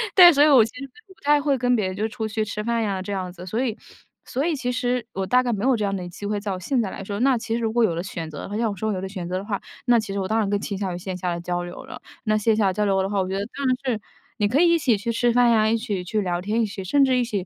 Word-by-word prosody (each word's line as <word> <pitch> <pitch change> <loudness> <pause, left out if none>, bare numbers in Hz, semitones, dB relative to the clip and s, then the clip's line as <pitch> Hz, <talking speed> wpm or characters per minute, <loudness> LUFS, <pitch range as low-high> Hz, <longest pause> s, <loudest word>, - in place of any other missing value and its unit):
对， 355 -2 +10
所 285 0 +5
以 - - +6
我 265 -6 +7
其 225 - -8
实 280 -1 -7 0.2
不 385 - -17
太 295 0 +4
会 285 -1 +1
跟 245 +1 +2
别 215 -4 0
人 185 0 -3
就 215 +3 -1
出 220 -1 -4
去 220 0 -1
吃 210 0 -4
饭 235 +1 0
呀， 200 -3 -1
这 200 +2 -4
样 185 -2 -3
子。 175 0 -10
所 220 +7 -1
以 235 -3 -2 0.5
所 260 +3 -2
以 330 -2 +1
其 250 -2 -2
实， 245 -2 -1
我 190 0 -2
大 250 +3 +4
概 245 -2 0
没 205 -1 -3
有 260 0 +4
这 210 - -1
样 195 0 -1
的 180 -2 -5
机 190 +4 -9
会， 205 0 -1
在 200 -1 -4
我 185 - -3
现 245 +7 0
在 210 - -2
来 195 - -7
说。 200 +1 -4
那 260 -1 +3
其 225 0 -4
实 235 - -1
如 225 -1 0
果 235 +1 +2
有 180 - +2
的 170 - -2
选 170 -4 -5
择 150 -2 -8
的 - - -7
话， 205 - -5
要 225 -1 +1
我 - - -6
说 215 +3 -2
有 185 - -3
的 190 - -4
选 190 -3 -6
择 185 - -1
的 190 - -5
话， 205 -2 -3 0.2
那 240 -1 +5
其 215 -2 -5
实 200 - -2
我 190 - -2
当 220 +2 +1
然 210 -3 0
更 205 0 +1
倾 200 - -4
向 190 -3 -3
于 - - -4
线 185 +1 -5
下 180 -1 -2
的 - - -5
交 175 0 -2
流 175 0 -8
了。 - - -10 0.2
那 215 -3 +1
线 215 +1 +2
下 200 -3 +2
交 210 +3 0
流 195 -1 +2
的 190 - -2
话， 200 -1 0
我 185 - -2
觉 190 - -2
得 200 - -2
当 280 0 -3
然 255 - +3
是 230 -5 -1 0.4
你 210 -3 +2
可 255 +7 +2
以 345 -1 +5
一 335 - +3
起 245 -8 +2
去 230 +4 -2
吃 240 +1 +2
饭 240 0 +4
呀、 220 -1 +4
一 230 - +2
起 210 -5 -3
去 210 +4 -1
聊 175 -2 -1
天， 215 +5 0
一 - - +2
起 200 -1 -6
甚 275 +9 +3
至 260 -1 +2
一 250 - +2
起， 205 -6 -3
215 Hz, 385 characters per minute, -23 LUFS, 195-245 Hz, 0.5 s, 对